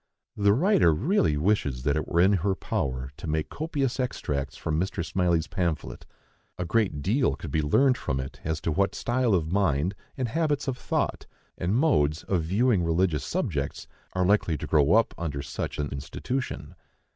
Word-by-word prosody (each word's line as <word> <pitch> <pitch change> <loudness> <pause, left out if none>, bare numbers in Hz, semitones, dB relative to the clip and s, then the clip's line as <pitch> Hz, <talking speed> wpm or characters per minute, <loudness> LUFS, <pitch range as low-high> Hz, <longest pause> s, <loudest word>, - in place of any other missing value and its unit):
The 100 -1 +3
writer 125 - +4
really 120 - +2
wishes 75 -8 0
that 70 0 +1
it 75 - -2
were 85 -1 +2
in 95 +3 +5
her 95 +1 +1
power 65 -5 -3
to - - -7
make 75 0 -1
copious 145 -5 -2
extracts 70 - -2
from 80 0 -1
Mr. 90 -1 -2
Smylie's 85 -1 +1
pamphlet. 85 -5 -3 0.5
A 90 - -2
great 85 -6 0
deal 125 - +2
could 80 - -8
be 80 - +1
learned 125 - +3
from 65 - -2
it 65 0 -6
as 80 -1 -2
to 80 - -1
what 100 +5 +1
style 120 -3 +1
of 80 -2 -1
mind, 90 -3 +1 0.2
and 130 -2 -1
habits 150 0 0
of 130 - 0
thought, - - -2 0.3
and 90 +5 -1
modes 80 - +2
of 90 -4 0
viewing 100 +5 +2
religious 85 -3 +1
subjects, - - -2 0.3
are 95 -1 +1
likely 90 -5 +2
to 80 - -5
grow 75 +1 +3
up 115 +1 +3
under 70 -5 -3
such 70 - -4
an 75 -1 -2
institution. 125 - -4
90 Hz, 180 wpm, -27 LUFS, 75-115 Hz, 0.5 s, in